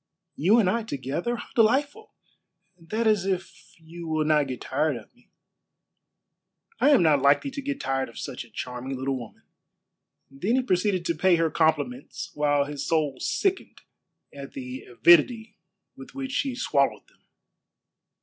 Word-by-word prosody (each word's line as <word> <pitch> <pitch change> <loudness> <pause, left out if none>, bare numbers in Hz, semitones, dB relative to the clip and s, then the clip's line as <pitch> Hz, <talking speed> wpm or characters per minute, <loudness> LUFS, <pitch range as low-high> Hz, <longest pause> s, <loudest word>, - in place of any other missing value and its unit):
"You 190 +10 +4
and 215 -5 +3
I 230 +5 +1
together. 155 - -3
How 240 - -9
delightful! 275 - +1 0.6
That 210 +7 -3
is 210 -3 +2
if 185 -2 -5
you 165 +1 -10
will 155 -1 0
not 150 -2 +3
get 130 -2 -6
tired 145 +2 0
of 115 - -14
me." 245 - -29 1.5
"I - - +4
am 275 -11 +5
not 150 -4 +4
likely 140 - +3
to 280 - -5
get 280 0 -4
tired 135 -1 -1
of 115 - -15
such 125 - -6
a 120 - -18
charming 125 +4 -5
little 135 +1 -2
woman." 120 -4 -9 0.9
Then 185 - -1
he 260 - +2
proceeded 185 -4 0
to 170 - +1
pay 175 +3 +3
her 165 -1 +1
compliments, 170 +10 -1
while 145 -1 +2
his 145 -1 -5
soul 150 -5 0
sickened 385 -1 -1 0.5
at 140 -1 -9
the 130 0 -7
avidity 205 - +3 0.4
with 135 - -13
which 270 -1 -4
she 275 -2 -1
swallowed 140 - 0
them. - - -30
165 Hz, 160 wpm, -26 LUFS, 140-230 Hz, 1.5 s, am